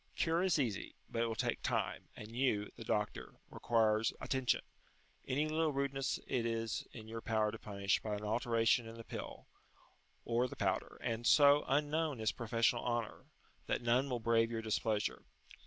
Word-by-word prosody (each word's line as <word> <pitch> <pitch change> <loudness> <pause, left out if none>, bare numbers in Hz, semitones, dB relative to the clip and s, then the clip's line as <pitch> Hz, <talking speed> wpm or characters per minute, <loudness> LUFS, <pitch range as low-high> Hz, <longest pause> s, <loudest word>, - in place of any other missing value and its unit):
Cure 165 +1 +1
is 185 -3 +3
easy, 120 -9 -2 0.2
but 115 - -1
it 115 - +2
will 115 - -2
take - - -1
time, - - -1
and 110 +2 -9
you, 115 -6 +1
the - - -8
doctor, - - -2 0.2
require 110 -2 +2 0.2
attention; 130 -3 +1 0.7
any 145 +4 +1
little 155 0 +1
rudeness 135 -1 -1
it 125 - 0
is 115 -1 -2
in 110 -2 -10
your 115 0 -6
power 110 -2 +1
to 115 - -8
punish 100 -2 0
by 105 -1 -3
an 105 - -6
alteration 115 +1 +2
in 115 - -8
the 115 - -9
pill, - - -7 0.8
or 120 +2 +1
the - - -8
powder, - - -1
and, 115 +1 -1
so 145 0 +7
unknown 150 0 +1
is 110 -1 +1
professional 115 0 +1
honour, 120 -3 -2 0.4
that - - -1
none 125 +4 +2
will 125 -2 -1
brave 115 0 +3
your 115 -1 -3
displeasure. 105 - 0
115 Hz, 170 wpm, -35 LUFS, 110-135 Hz, 0.8 s, so